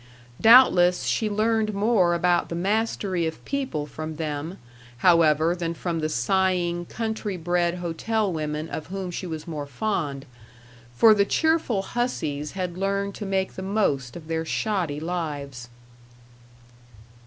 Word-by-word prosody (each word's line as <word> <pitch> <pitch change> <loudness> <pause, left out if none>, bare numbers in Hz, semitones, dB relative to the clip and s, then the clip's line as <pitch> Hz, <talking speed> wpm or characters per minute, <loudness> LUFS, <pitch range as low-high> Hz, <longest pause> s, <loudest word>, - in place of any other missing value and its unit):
Doubtless 200 -7 +6
she 220 -2 0
learned 215 0 +1
more 200 -4 +3
about 175 0 +1
the 170 - -4
mastery 195 -2 0
of 160 - -7
people 260 - -2
from 155 +2 -6
them, 155 +2 -4 0.5
however, 165 -1 +4
than 170 -1 -3
from 170 0 -3
the 155 0 -1
sighing, 175 +5 0
country 220 -3 -3
bred 175 0 0
hotel 180 +4 -1
women 155 0 -3
of 155 - -6
whom 190 0 -5
she 180 +1 -5
was 160 0 -6
more 150 -3 -5
fond; 140 -2 -2 0.7
for 220 - +7
the 205 -1 +3
cheerful 315 -5 +1
hussies 155 - -3
had 180 -2 -4
learned 200 0 -1
to 205 - -6
make 190 -1 -1
the - - -7
most 190 - -1
of 165 -3 -10
their 160 0 -1
shoddy 170 -4 -1
lives. 145 -7 -5
175 Hz, 140 wpm, -25 LUFS, 155-200 Hz, 0.7 s, for